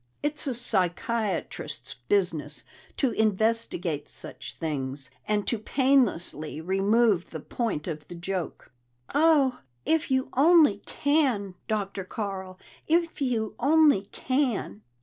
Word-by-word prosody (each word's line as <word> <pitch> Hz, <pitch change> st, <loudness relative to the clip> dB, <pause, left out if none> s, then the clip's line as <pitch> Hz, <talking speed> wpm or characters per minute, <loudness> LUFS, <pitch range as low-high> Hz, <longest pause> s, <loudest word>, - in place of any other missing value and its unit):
It's 295 Hz, 0 st, -1 dB
a 260 Hz, -, 0 dB
psychiatrist's 185 Hz, -, -1 dB, 0.2 s
business 165 Hz, -7 st, 0 dB, 0.3 s
to 265 Hz, -4 st, +2 dB
investigate 215 Hz, -8 st, 0 dB
such -, -, -5 dB
things, 135 Hz, -4 st, -4 dB, 0.2 s
and 210 Hz, -1 st, +1 dB
to 235 Hz, -, -1 dB
painlessly 230 Hz, -, +1 dB
remove 195 Hz, +3 st, +2 dB
the 160 Hz, -, -6 dB
point 210 Hz, -, -3 dB
of 155 Hz, -4 st, -6 dB
the 175 Hz, -, -8 dB
joke." 180 Hz, -3 st, -5 dB, 0.4 s
"Oh, 290 Hz, -4 st, +4 dB, 0.3 s
if 320 Hz, -2 st, +1 dB
you 260 Hz, 0 st, +1 dB
only 295 Hz, -, +5 dB
can, 270 Hz, -10 st, +1 dB
Dr. 200 Hz, -2 st, -2 dB
Carl! 190 Hz, -2 st, -5 dB, 0.3 s
If 335 Hz, -1 st, +1 dB
you 230 Hz, -5 st, 0 dB
only 290 Hz, -6 st, +4 dB
can!" 250 Hz, -, -1 dB
210 Hz, 110 wpm, -27 LUFS, 175-260 Hz, 0.4 s, only